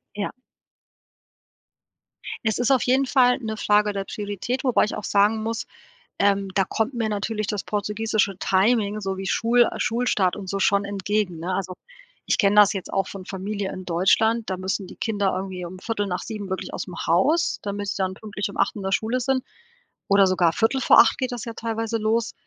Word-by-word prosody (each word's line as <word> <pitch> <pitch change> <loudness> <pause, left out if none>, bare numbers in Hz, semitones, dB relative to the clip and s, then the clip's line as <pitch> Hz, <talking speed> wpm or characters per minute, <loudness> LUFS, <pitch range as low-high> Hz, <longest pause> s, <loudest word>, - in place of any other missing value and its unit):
Ja. 205 -1 -3 2.1
Es 220 -2 0
ist 245 +2 +1
auf 260 -3 +3
jeden 265 +2 +3
Fall 250 -2 +3
'ne 220 -3 -4
Frage 210 -1 +2
der 195 -1 -3
Priorität, 205 +6 -4
wobei 255 -5 +3
ich - - -4
auch 210 - -6
sagen 210 +2 +2
muss, 230 +1 -3 0.5
ähm, 200 -1 +2
da 195 - +3
kommt 225 +6 -2
mir 230 -2 -1
natürlich 215 +1 -2
das 210 -1 -3
portugiesische 210 -1 -1
Timing 210 +2 +2
sowie 195 -1 -4
Schul 235 +5 +3
äh, - - -7
Schulstart 225 -6 +1
und 195 -2 -8
so 200 - -2
schon 200 +1 +2
entgegen, 200 -2 -2
ne? 180 +3 -3
Also, 185 -1 -3 0.5
ich - - +1
kenne 205 -1 +3
das 205 -1 +7
jetzt 195 -3 -6
auch 195 - +1
von 190 -2 -9
Familie 200 +1 -4
in 185 - -7
Deutschland, 215 +6 +2
da 185 - -1
müssen 190 +1 -3
die - - -12
Kinder 205 -4 0
irgendwie 185 -1 -5
um 185 +2 -9
7:15 205 -1 -3
wirklich 190 - -4
ausm 180 - -6
Haus, 275 - +2
damit 205 0 -4
sie - - -2
dann 190 0 -1
pünktlich 205 0 -5
um 200 - -10
8:00 200 - +1
in 205 - -5
der 195 0 -2
Schule 230 +5 0
sind 260 +1 0 0.7
oder 200 -1 +5
sogar 180 -3 +2
7:45 235 +1 +4
geht 255 -1 -2
das 240 -3 -5
ja 230 - -4
teilweise 225 0 -2
los. 225 +2 0
205 Hz, 185 wpm, -24 LUFS, 195-225 Hz, 2.1 s, das